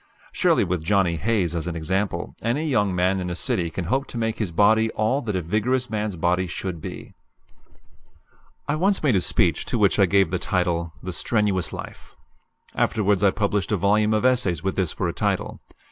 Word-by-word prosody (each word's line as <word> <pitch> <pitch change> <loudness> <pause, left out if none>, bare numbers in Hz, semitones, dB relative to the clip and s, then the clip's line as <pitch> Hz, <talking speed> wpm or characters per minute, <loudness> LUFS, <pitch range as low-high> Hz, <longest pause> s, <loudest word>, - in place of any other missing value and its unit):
Surely - - +2
with 90 -2 -2
Johnny 90 -1 +2
Hayes 95 -3 0
as 85 0 -3
an 85 - -3
example, 90 +2 -2
any 130 +8 -1
young 105 -9 +1
man 90 +2 +1
in 90 -1 -3
a 90 - -3
city 85 -1 0
can 85 +1 -5
hope 135 +9 0
to - - -7
make 115 -1 -1
his 105 -5 -2
body 110 +5 +3
all 110 +6 0
that 105 -6 -3
a 90 - -1
vigorous 120 +8 0
man's 105 -2 -2
body 90 +2 0
should 85 -1 -5
be. - - -8 1.5
I 145 - 0
once 195 +3 +1
made 135 -7 +3
a 95 - +3
speech - - +1
to - - -2
which - - +3
I - - +5
gave 100 -4 +3
the 90 - -1
title 85 -3 -1
"The 90 0 -5
Strenuous 100 -3 0
Life." - - -9 0.6
Afterwards 105 -3 +1
I 100 - +6
published 100 -1 -1
a 105 - +2
volume 105 +3 +2
of 110 - 0
essays 110 - +2
with 95 0 -1
this 95 -5 0
for - - -2
a - - -2
title. - - -2
100 Hz, 200 wpm, -23 LUFS, 90-110 Hz, 1.5 s, I